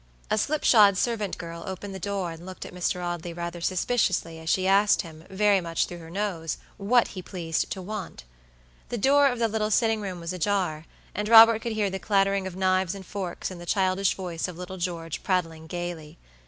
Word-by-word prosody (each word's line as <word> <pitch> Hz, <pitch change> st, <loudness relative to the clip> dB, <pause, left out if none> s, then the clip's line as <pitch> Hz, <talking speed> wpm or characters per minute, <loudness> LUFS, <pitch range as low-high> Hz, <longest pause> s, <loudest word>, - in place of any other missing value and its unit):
A -, -, +3 dB
slipshod 215 Hz, -8 st, +4 dB
servant 215 Hz, -2 st, -1 dB
girl 170 Hz, -1 st, -7 dB
opened 190 Hz, +1 st, -6 dB
the 190 Hz, -, -6 dB
door 195 Hz, -2 st, -2 dB
and 165 Hz, +1 st, -10 dB
looked 185 Hz, 0 st, -8 dB
at -, -, -10 dB
Mr. 180 Hz, 0 st, -1 dB
Audley 175 Hz, -1 st, -4 dB
rather 170 Hz, 0 st, -5 dB
suspiciously 180 Hz, -3 st, 0 dB
as 160 Hz, 0 st, -5 dB
she 185 Hz, +1 st, +2 dB
asked 200 Hz, +2 st, +4 dB
him, 160 Hz, -1 st, -12 dB
very 200 Hz, 0 st, +3 dB
much 165 Hz, -1 st, 0 dB
through 175 Hz, -, -9 dB
her 165 Hz, -1 st, -11 dB
nose, 175 Hz, -4 st, -3 dB, 0.2 s
what 230 Hz, +4 st, +3 dB
he 185 Hz, -, -7 dB
pleased 170 Hz, -3 st, -2 dB
to 190 Hz, -, -5 dB
want. 210 Hz, -, -6 dB, 0.7 s
The 240 Hz, -, -2 dB
door 280 Hz, +5 st, +5 dB
of 250 Hz, -2 st, 0 dB
the 230 Hz, -1 st, +2 dB
little 215 Hz, -1 st, -1 dB
sitting 220 Hz, 0 st, +2 dB
room 185 Hz, -3 st, -5 dB
was 170 Hz, +1 st, -4 dB
ajar, 180 Hz, -4 st, -1 dB, 0.3 s
and 210 Hz, +1 st, -3 dB
Robert 225 Hz, -1 st, +9 dB
could 230 Hz, -1 st, -3 dB
hear 210 Hz, -3 st, 0 dB
the 190 Hz, -, -4 dB
clattering 195 Hz, -1 st, +1 dB
of 185 Hz, -, -7 dB
knives 185 Hz, 0 st, +1 dB
and 195 Hz, -1 st, -9 dB
forks 190 Hz, -2 st, -5 dB
and 175 Hz, -2 st, -9 dB
the 175 Hz, -, -10 dB
childish 190 Hz, +1 st, +1 dB
voice 175 Hz, -4 st, -4 dB
of 180 Hz, -2 st, -8 dB
little 180 Hz, +1 st, -7 dB
George 170 Hz, -3 st, -4 dB
prattling 165 Hz, -4 st, -1 dB
gayly. 175 Hz, -2 st, -6 dB
185 Hz, 205 wpm, -26 LUFS, 170-205 Hz, 0.7 s, Robert